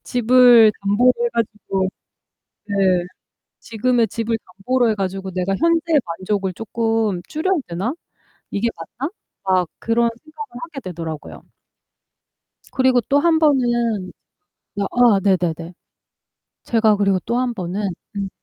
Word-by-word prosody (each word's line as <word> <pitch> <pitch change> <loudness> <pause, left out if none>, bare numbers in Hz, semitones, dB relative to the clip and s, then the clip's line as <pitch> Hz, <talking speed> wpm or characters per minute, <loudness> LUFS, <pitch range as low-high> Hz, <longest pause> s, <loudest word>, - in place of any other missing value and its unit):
집을 245 -2 +6
담보로 210 +6 +4
해 240 - +2
가지고 210 -4 -2 0.8
네 200 - -4 0.9
'지금의 230 +1 +1
집을 230 0 -2 0.2
담보로 245 +4 +1
해 220 - +2
가지고 195 -1 -4
내가 185 +2 -1
현재의 330 -2 +2
만족을 190 +2 -2
쪼끔 225 -3 -1
줄여야 370 +5 0
되나? 185 +9 -2 0.6
이게 215 +4 0
맞나?' 235 - -6 0.3
막 185 -3 +2
그런 235 +1 +2
생각을 300 -5 -10
하게 330 -4 -7
되더라고요. 165 - -7 1.3
그리고 260 -1 +3
또 280 +5 +2
한번은 245 - +2 0.7
어 200 - 0 0.3
아 - - 0
네네네. 175 -3 0 0.9
제가 220 -2 +3
그리고 195 -2 +2
또 235 +2 -1
한번은 205 -5 -2 0.3
음. 195 -1 -3
225 Hz, 245 characters per minute, -20 LUFS, 195-250 Hz, 1.3 s, 집을